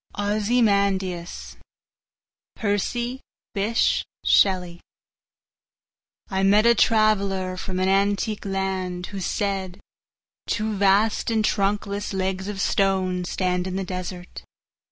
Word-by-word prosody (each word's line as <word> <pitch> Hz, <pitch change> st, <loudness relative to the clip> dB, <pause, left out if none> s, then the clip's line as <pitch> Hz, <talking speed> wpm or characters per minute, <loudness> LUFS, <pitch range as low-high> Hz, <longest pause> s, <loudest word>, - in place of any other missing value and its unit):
Ozymandias 200 Hz, -4 st, 0 dB, 1.0 s
of -, -, -6 dB, 0.3 s
Egypt 245 Hz, +2 st, -3 dB, 0.3 s
I 190 Hz, -4 st, +1 dB, 1.6 s
MET 205 Hz, +3 st, +4 dB
a 235 Hz, -, +7 dB
traveller 200 Hz, -5 st, +2 dB
from 185 Hz, 0 st, -4 dB
an 185 Hz, -, +1 dB
antique 200 Hz, +2 st, +1 dB
landWho 190 Hz, -1 st, -3 dB
said: 190 Hz, -1 st, -2 dB, 0.7 s
Two 215 Hz, 0 st, -1 dB
vast 200 Hz, +4 st, +2 dB
and 220 Hz, -2 st, +1 dB
trunkless 200 Hz, 0 st, -1 dB
legs 190 Hz, 0 st, -2 dB
of 205 Hz, -1 st, -4 dB
stoneStand 185 Hz, -2 st, 0 dB
in 185 Hz, -, -4 dB
the 195 Hz, -, -2 dB
desert. 180 Hz, -1 st, -6 dB
195 Hz, 90 wpm, -24 LUFS, 185-210 Hz, 1.6 s, a